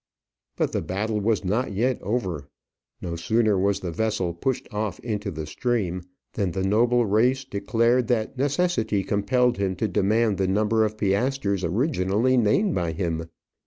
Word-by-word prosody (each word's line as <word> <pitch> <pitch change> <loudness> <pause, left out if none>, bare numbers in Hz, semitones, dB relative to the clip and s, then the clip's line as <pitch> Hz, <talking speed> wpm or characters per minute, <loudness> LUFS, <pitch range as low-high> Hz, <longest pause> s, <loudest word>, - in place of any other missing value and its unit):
But - - 0
the - - -1
battle 105 +3 -2
was 105 -1 0
not 110 +4 0
yet 125 +5 0
over. 95 - -2 0.6
No 85 -1 -3
sooner 110 +5 +2
was 100 +1 +1
the 90 - -3
vessel 100 -1 -1
pushed 125 +10 -2
off 105 -1 -2
into 105 -3 -3
the 80 -4 -5
stream, 90 0 -1 0.3
than 95 -5 -1
the 95 - -2
noble 120 +4 +3
reis 125 +6 +2
declared 115 +3 +1
that 115 0 0
necessity 140 - 0
compelled 120 +6 +1
him 95 -1 0
to 110 +5 -1
demand 105 +1 +1
the 95 - +1
number 110 +3 +2
of 105 0 -4
piastres 100 -1 0
originally 110 - +1
named 130 - +2
by 85 -6 -1
him. 80 -1 -3
105 Hz, 160 wpm, -24 LUFS, 95-120 Hz, 0.6 s, noble